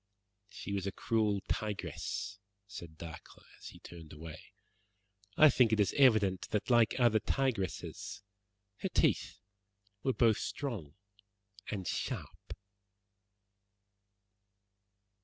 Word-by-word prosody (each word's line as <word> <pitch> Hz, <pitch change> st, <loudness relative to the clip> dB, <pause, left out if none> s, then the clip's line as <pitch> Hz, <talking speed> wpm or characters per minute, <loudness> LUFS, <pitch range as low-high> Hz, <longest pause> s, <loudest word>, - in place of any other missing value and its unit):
"She 100 Hz, -, -6 dB
was 100 Hz, -1 st, -1 dB
a -, -, -1 dB
cruel 105 Hz, -3 st, +1 dB
tigress," 105 Hz, 0 st, -3 dB, 0.3 s
said 85 Hz, -6 st, -10 dB
Dacre, 80 Hz, -1 st, -10 dB
as -, -, -10 dB
he -, -, -10 dB
turned 80 Hz, -3 st, -11 dB
away. 80 Hz, 0 st, -9 dB, 0.9 s
"I 155 Hz, -, +9 dB
think 125 Hz, -3 st, +4 dB
it 110 Hz, -, +2 dB
is 100 Hz, -, +3 dB
evident 110 Hz, -9 st, +4 dB
that 105 Hz, +3 st, -1 dB
like 120 Hz, +1 st, +4 dB
other 120 Hz, -3 st, +5 dB
tigresses 100 Hz, -, -2 dB, 0.5 s
her -, -, -3 dB
teeth -, -, +2 dB, 0.6 s
were 130 Hz, -, +1 dB
both 115 Hz, -3 st, +4 dB
strong 105 Hz, -, -4 dB, 0.7 s
and 95 Hz, -4 st, -3 dB
sharp." -, -, -4 dB
105 Hz, 105 wpm, -33 LUFS, 95-115 Hz, 0.9 s, I